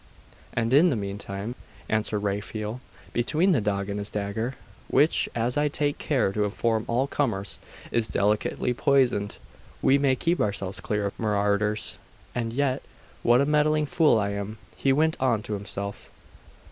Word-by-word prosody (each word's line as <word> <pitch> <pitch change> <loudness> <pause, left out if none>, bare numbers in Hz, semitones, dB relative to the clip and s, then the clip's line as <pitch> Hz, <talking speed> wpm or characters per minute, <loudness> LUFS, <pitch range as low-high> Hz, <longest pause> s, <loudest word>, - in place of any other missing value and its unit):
'And 115 +1 0
in 160 +6 +7
the 140 - +1
meantime,' 100 +1 -4 0.3
answered 110 0 0
Raphael, 105 +3 -3 0.3
'between 155 +10 +2
the 140 -10 +3
dog 100 -1 -1
and 100 0 -3
this 100 0 -1
dagger, 105 +5 -3 0.3
which, 145 +5 +3
as 120 +2 0
I 150 0 +3
take 145 0 0
care 130 -9 +1
to 105 +1 0
inform 110 +2 0
all 120 +3 +1
comers, 115 -9 -1 0.3
is 115 -2 +1
delicately 105 +4 +1
poisoned, 125 -6 +2 0.4
we 140 +1 +4
may 135 -2 +3
keep 170 +7 0
ourselves 100 -2 -2
clear 105 -1 -1
of 100 - -4
marauders. 105 0 0 0.3
And 115 -2 -2
yet, 130 +1 0 0.4
what 120 +2 +5
a - - +3
meddling 150 +1 +3
fool 150 -4 +4
I 100 -2 +1
am!' 100 +2 -4 0.2
he 135 - +2
went 155 +3 +2
on 120 -5 +1
to 110 - -4
himself. 100 0 -4
115 Hz, 160 wpm, -26 LUFS, 100-135 Hz, 0.4 s, in